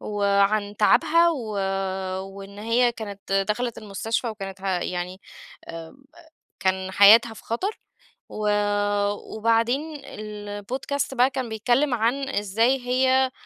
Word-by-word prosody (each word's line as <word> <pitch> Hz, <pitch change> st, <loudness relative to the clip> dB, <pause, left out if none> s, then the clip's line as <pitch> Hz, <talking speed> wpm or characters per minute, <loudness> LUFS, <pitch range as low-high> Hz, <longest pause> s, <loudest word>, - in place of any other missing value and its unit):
وعن 205 Hz, 0 st, +1 dB
تعبها 335 Hz, +11 st, +4 dB
و 245 Hz, -9 st, -4 dB, 0.7 s
وإن 195 Hz, +1 st, -10 dB
هي 235 Hz, +2 st, +2 dB
كانت 200 Hz, -4 st, -9 dB, 0.2 s
دخلت 240 Hz, +2 st, -1 dB
المستشفى 225 Hz, +3 st, -3 dB
وكانت 195 Hz, -3 st, -7 dB
ه -, -, -7 dB
يعني 180 Hz, 0 st, -3 dB, 0.5 s
آمم، 165 Hz, +11 st, -9 dB, 0.6 s
كان 190 Hz, 0 st, -1 dB
حياتها 220 Hz, +4 st, +7 dB
في -, -, -14 dB
خطر 375 Hz, -, -3 dB, 0.5 s
و 210 Hz, -1 st, -2 dB, 0.9 s
وبعدين 235 Hz, +8 st, +1 dB
الPodcast 210 Hz, +7 st, -5 dB
بقى 250 Hz, +1 st, +4 dB
كان 260 Hz, -3 st, -4 dB
بيتكلم 245 Hz, +6 st, +1 dB
عن 245 Hz, +4 st, 0 dB
إزاي 225 Hz, +3 st, +1 dB
هي 260 Hz, +1 st, +3 dB
220 Hz, 110 wpm, -24 LUFS, 200-255 Hz, 0.9 s, حياتها